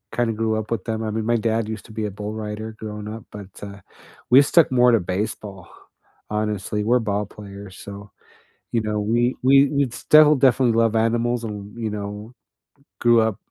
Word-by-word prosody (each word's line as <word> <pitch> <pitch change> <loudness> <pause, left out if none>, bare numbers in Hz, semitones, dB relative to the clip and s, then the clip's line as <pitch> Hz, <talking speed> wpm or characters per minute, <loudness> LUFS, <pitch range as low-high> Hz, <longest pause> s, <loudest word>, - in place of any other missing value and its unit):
Kinda 120 -1 +1
grew 110 0 -1
up 110 - -7
with 110 -5 -2
them. 110 -1 -3
I 110 - -2
mean, 110 0 -3
my 120 +1 +2
dad 115 0 -1
used 110 -1 -6
to - - -14
be 110 0 -3
a 105 - -3
bull 105 +2 -6
rider, 110 0 -6
growing 105 -1 -7
up, 110 0 -8
but, 105 -2 -9 0.2
uh, 100 0 -8 0.5
we 130 +3 +8
stuck 160 0 +4
more 125 -1 +5
to 115 - +4
baseball; 95 +1 -5 0.6
honestly, 105 -1 -2
we're 125 +2 +3
ball 105 -2 -1
players, 100 -1 -11
so, 100 0 -10 0.6
you 115 - +1
know, 105 -1 -2
we 120 +4 +1
we 135 +1 +6
we'd 140 -4 0
still 150 0 +6
definitely 130 -3 +3
love 115 -1 +2
animals 120 +1 +1
and, 105 0 -7
you 115 -2 -3
know, 105 +2 -6 0.7
grew 120 -1 +4
up 110 -3 0
110 Hz, 190 wpm, -22 LUFS, 105-120 Hz, 0.7 s, we